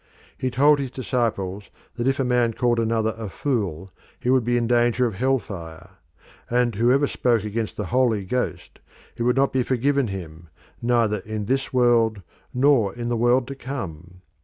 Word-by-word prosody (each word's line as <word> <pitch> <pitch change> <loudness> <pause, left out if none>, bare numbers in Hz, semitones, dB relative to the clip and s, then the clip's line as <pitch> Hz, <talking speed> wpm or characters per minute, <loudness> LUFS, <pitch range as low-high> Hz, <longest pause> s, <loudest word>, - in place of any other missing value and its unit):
He 130 - -2
told 145 +4 +4
his 135 -2 -3
disciples 110 -7 -2 0.3
that 120 +1 -2
if 135 +1 +1
a - - +2
man 125 -2 +2
called 120 0 +1
another 110 -1 0
a 110 -3 -5
fool 95 - -2 0.3
he 125 - 0
would 130 -2 +3
be 120 +1 +1
in 120 - 0
danger 120 +1 +2
of 115 - -1
hell 130 +7 +1
fire; 85 -8 -9 0.6
and 120 -1 +2
whoever 125 +7 +3
spoke 120 -5 +1
against 110 +1 -3
the 105 - -2
Holy 120 -6 +2
Ghost, 125 +6 -3 0.4
it 120 - -8
would 125 +1 +2
not 135 +1 +2
be 130 - +2
forgiven 135 +2 +1
him 85 -4 -8 0.3
"neither 115 -3 +2
in 105 +1 -5
this 135 +4 -1
world 115 -5 +2 0.3
nor 125 -6 +3
in 120 0 -4
the 120 - 0
world 120 +2 +3
to - - -4
come." 90 - -7
120 Hz, 180 wpm, -23 LUFS, 105-130 Hz, 0.6 s, told